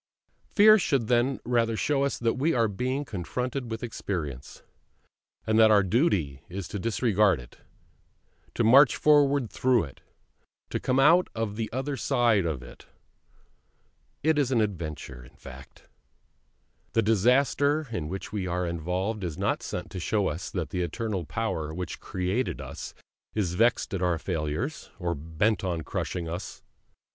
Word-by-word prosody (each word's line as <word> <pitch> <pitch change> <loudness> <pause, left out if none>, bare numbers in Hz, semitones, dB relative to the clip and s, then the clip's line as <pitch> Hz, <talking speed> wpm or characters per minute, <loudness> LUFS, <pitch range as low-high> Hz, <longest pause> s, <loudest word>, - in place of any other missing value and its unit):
Fear 215 +1 +7
should 135 - 0
then 125 +2 +2
rather 115 -2 +1
show 140 +2 +1
us 140 - -1
that 115 -1 +1
we 155 +5 +1
are 115 -2 +3
being 130 +7 -2
confronted 125 +6 -4
with 115 +1 -5
experience; 80 - -5 0.8
and 110 0 +2
that 110 -1 +7
our 105 -2 +5
duty 95 - +1
is 95 0 -5
to 100 - -4
disregard 105 - +2
it, - - -14 1.0
to - - +1
march 130 +5 +7
forward 145 -4 +3
through 125 -3 +2
it, 70 -5 -11 0.7
to - - -1
come 130 +1 +1
out 165 +6 +5
on 110 -2 -2
the 110 0 -4
other 135 +3 -2
side 115 -8 +2
of 70 -6 -3
it. - - -14 1.4
It 155 0 +3
is 135 -3 +1
all 125 - +2
an 110 - +4
adventure, 75 - -5
in - - -17
fact! - - -13 1.1
The 115 - +3
disaster 135 +7 +2
in 85 -9 -3
which 95 +2 -6
we 100 -3 -2
are 90 +1 -1
involved 90 +5 -2
is 85 -4 -4
not - - 0
sent 90 - -5
to 95 - -5
show 100 +3 0
us 80 +5 -5
that 90 -5 -4
the 90 - -1
Eternal 95 +1 -3
Power 80 -9 -3
which 90 -1 -5
created 95 +7 -2
us - - -8 0.4
is 95 -6 0
vexed 115 +3 +2
at 95 - -2
our 90 -2 +1
failures, 80 - -3
or 85 -3 -2
bent 80 +7 -1
on 85 -3 -1
crushing 85 +2 -4
us. 85 +3 -6
105 Hz, 160 wpm, -27 LUFS, 90-125 Hz, 1.4 s, Fear